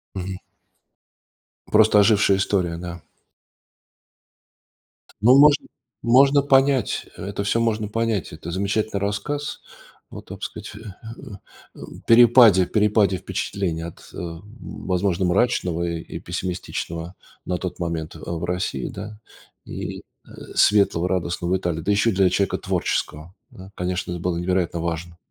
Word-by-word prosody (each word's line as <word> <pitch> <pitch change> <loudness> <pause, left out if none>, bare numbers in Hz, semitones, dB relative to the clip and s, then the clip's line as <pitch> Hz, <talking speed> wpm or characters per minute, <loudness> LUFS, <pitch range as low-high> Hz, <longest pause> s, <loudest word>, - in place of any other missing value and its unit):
Мгм. 95 0 -4 1.3
Просто 105 -1 +5
ожившая 100 -2 +4
история, 90 -4 0
да. 85 -1 -8 2.2
Ну, 125 +5 +6
можно 145 0 +6 0.4
можно 135 +4 +5
понять, 135 -1 +2
это 100 +1 -5
всё 115 +3 +1
можно 110 -2 0
понять. 110 -5 -2
Это 80 +2 -7
замечательный 100 +3 -1
рассказ 105 +9 -3 0.5
о, - - -9
так - - -11
сказать, - - -6
а, 105 -1 -10 0.7
перепаде 115 -5 +7
перепаде 105 -3 +2
впечатлений 90 -2 -3
от, 85 - -8
э, - - -10 0.4
возможно, 90 0 -1
мрачного 90 -3 +1
и 85 -1 -3
и - - -8
пессимистичного, 90 -1 -5 0.3
а, - - -12
на 90 - 0
тот 90 -1 -6
момент, 85 -2 -4
а, - - -10
в 80 - -5
России, 90 -7 -2
да, 105 0 -8 0.5
и, - - -6 0.3
э, - - -17 0.3
светлого, 100 -4 +3
радостного 90 -1 -1
в 95 - +3
Италии. 85 -3 -3
Да 95 - -4
еще 105 +3 +3
и - - -3
для 95 -1 +3
человека 95 +1 0
творческого, 80 +4 -2 0.2
да. 95 +1 -13
Конечно, 90 0 -3
это 85 - -4
было 90 -2 -1
невероятно 90 -1 -1
важно, 85 0 -4
95 Hz, 135 wpm, -23 LUFS, 85-110 Hz, 2.2 s, перепаде